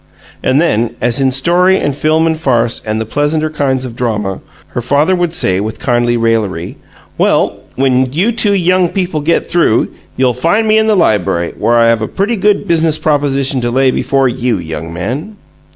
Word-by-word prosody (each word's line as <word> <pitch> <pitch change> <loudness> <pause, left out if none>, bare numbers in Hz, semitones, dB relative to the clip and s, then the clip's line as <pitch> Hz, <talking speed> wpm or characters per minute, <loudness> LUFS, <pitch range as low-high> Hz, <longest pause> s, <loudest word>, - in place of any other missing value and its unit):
And 130 - +2
then, 120 -7 0
as 120 +2 0
in 135 -1 +2
story 175 +8 +2
and 145 -6 -2
film 155 +2 +1
and 160 -1 +1
farce 120 -7 0
and 110 +1 -1
the 110 - -3
pleasanter 150 +5 -1
kinds 135 -4 -1
of 120 -3 -8
drama, 105 -6 -2 0.3
her 120 - -4
father 145 +9 +2
would 175 -2 -1
say, 95 -9 +1
with 110 +2 -4
kindly 120 -1 +1
raillery, 110 -7 -1 0.4
"Well, - - +1 0.2
when 130 -1 +1
you 185 - +1
two 210 -3 +2
young 180 -1 +2
people 180 -5 -2
get 165 +3 +1
through, 165 -9 +1 0.3
you'll 130 -1 +2
find 170 - 0
me 215 0 +4
in 220 - +1
the 215 - +3
library, 90 - +1
where 120 - +1
I 115 0 +4
have 115 -1 +1
a 110 - -2
pretty 205 +5 -1
good 205 0 +1
BUSINESS 165 -2 +2
proposition 140 -3 0
to 120 - -1
lay 130 +2 +2
before 135 +1 +1
YOU, 125 -2 -1
young 80 -1 -6
man!" 130 - -5
135 Hz, 190 wpm, -13 LUFS, 115-165 Hz, 0.4 s, me